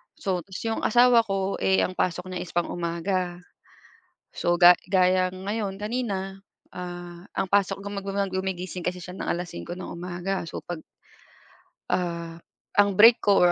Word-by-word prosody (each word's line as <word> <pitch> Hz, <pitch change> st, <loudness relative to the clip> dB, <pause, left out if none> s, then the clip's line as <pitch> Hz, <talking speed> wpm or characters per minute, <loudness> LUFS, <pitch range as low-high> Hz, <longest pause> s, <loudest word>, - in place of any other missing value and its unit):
so 185 Hz, -2 st, -1 dB
tas 190 Hz, -1 st, -8 dB
'yung 225 Hz, 0 st, -1 dB
asawa 240 Hz, 0 st, +6 dB
ko, 195 Hz, 0 st, -1 dB
eh, 190 Hz, 0 st, +3 dB
ang 185 Hz, -, -2 dB
pasok 180 Hz, 0 st, -1 dB
niya 180 Hz, -, -3 dB
is 180 Hz, -, -11 dB
pang 175 Hz, -, +1 dB
umaga. 175 Hz, +1 st, -2 dB, 0.9 s
So 175 Hz, 0 st, +1 dB
ga 175 Hz, +1 st, +9 dB, 0.2 s
gaya 185 Hz, -1 st, +3 dB
ngayon 195 Hz, +1 st, -3 dB
kanina, 200 Hz, -4 st, -3 dB, 0.3 s
ah, 175 Hz, -1 st, -7 dB
ang 190 Hz, -, 0 dB
pasok 195 Hz, -1 st, +2 dB
guma 200 Hz, 0 st, -4 dB
gumigising 190 Hz, -2 st, -3 dB
kasi 180 Hz, 0 st, -1 dB
siya 180 Hz, +1 st, -8 dB
ng -, -, -5 dB
5:00 175 Hz, -, -4 dB
ng 185 Hz, -, -7 dB
umaga, 180 Hz, +2 st, -3 dB
so -, -, -6 dB
pag 175 Hz, -2 st, -5 dB, 1.1 s
ah, 170 Hz, -2 st, -2 dB, 0.4 s
ang 200 Hz, 0 st, +6 dB
break 230 Hz, +4 st, +8 dB
ko 200 Hz, -3 st, +4 dB
or, 175 Hz, -, +6 dB
185 Hz, 155 wpm, -26 LUFS, 175-195 Hz, 1.1 s, ga